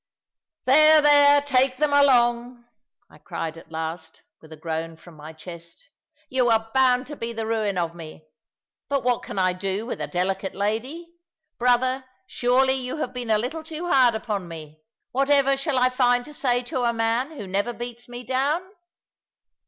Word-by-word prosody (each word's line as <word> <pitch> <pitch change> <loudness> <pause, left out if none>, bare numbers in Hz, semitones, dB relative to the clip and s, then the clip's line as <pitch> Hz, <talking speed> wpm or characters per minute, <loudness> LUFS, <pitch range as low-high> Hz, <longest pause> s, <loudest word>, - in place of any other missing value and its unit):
"There, 310 +4 +6
there; 290 -1 +6
take 265 -2 +1
them 300 0 +1
along," 240 -3 +2 0.4
I - - -19
cried 165 0 -5
at 165 - -15
last, 160 0 -6 0.2
with 160 - -17
a 160 - -10
groan 160 +1 -5
from 170 0 -16
my 155 +1 -10
chest: 170 - -12 0.4
"you 255 -3 +1
are 225 0 +1
bound 255 -1 +3
to 295 - -8
be 235 -3 -5
the 225 -1 -4
ruin 215 -3 -1
of 170 -1 -1
me. 160 -2 -11 0.6
But 280 -1 0
what 245 -1 +1
can - - -8
I 185 -1 +2
do 195 +3 -3
with 240 - -5
a - - -3
delicate 190 +2 -2
lady? 255 - -3 0.5
Brother, 255 +2 +2 0.2
surely 260 +1 +2
you 260 +1 -4
have 255 -4 -4
been 245 -2 -5
a 215 - +4
little 255 +9 -4
too 320 +2 -6
hard 250 -4 +5
upon 210 -5 -4
me. 155 -2 -10 0.3
Whatever 275 +1 +3
shall 275 0 -2
I 255 0 +4
find 245 -1 +2
to 300 - -12
say 245 -4 0
to 250 +1 -3
a 235 -1 +1
man 230 +6 -1
who 205 - -6
never 200 +5 -1
beats 240 0 -8
me 245 0 -8
down?" 275 +7 0
245 Hz, 175 wpm, -24 LUFS, 195-265 Hz, 0.6 s, There